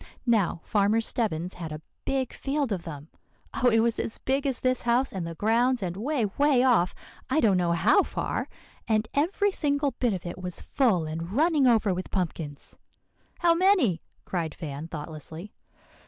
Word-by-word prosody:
Now, 205 -8 +2
Farmer 210 +1 +2
Stebbins 190 -7 -1
had 165 -3 -7
a 155 - -5 0.3
big 265 -2 -1
field 280 -2 -2
of 185 -4 -2
them, 150 -1 -8 0.4
oh! 250 - +3
it 225 -1 +4
was 230 0 +1
as 225 - -3
big 270 +2 -1
as 265 -3 -1
this 255 -1 +1
house 245 +3 +2
and 180 -4 -3
the 165 - -6
grounds, 235 +5 +2
and 175 -1 -3
way, 250 +3 0
way 285 -3 +4
off, 235 -9 +3 0.3
I 315 - +2
don't 210 -9 +4
know 175 -2 +2
how 170 - +4
far; - - -3 0.4
and 215 -1 +1
every 390 +8 +1
single 285 -4 0
bit 240 -2 0
of 180 - -7
it 175 - -6
was 180 -1 -5
full 220 - +1
and 165 +4 -5
running 300 0 +3
over 220 -5 +3
with 185 +1 -5
pumpkins." 160 -6 -3 0.6
"How 340 -1 +5
many?" 335 - +3 0.2
cried 165 -4 -3
Van 150 -1 -6
thoughtlessly. 160 +4 -7
220 Hz, 175 wpm, -27 LUFS, 175-265 Hz, 0.6 s, How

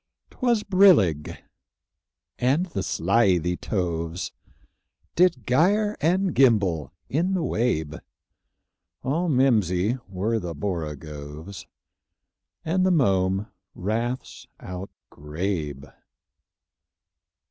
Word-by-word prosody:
'Twas 240 -4 +1
brillig, 175 - +4 1.0
and 135 +8 +2
the 95 - -2
slithy 90 -2 +2
toves 85 -2 -3 0.8
Did 170 - +3
gyre 205 +11 +2
and 180 +4 +2
gimble 100 - +3 0.2
in 175 +7 0
the 175 - -1
wabe; 80 - -1 1.0
All 160 +7 0
mimsy 115 - +2
were 105 +5 -1
the 85 -4 -5
borogoves, 75 +1 -6 1.0
And 180 +3 +1
the 185 - +3
mome 95 - +2 0.3
raths 115 +6 -3
outgrabe. 80 -4 -5
100 Hz, 80 wpm, -25 LUFS, -, 1.0 s, brillig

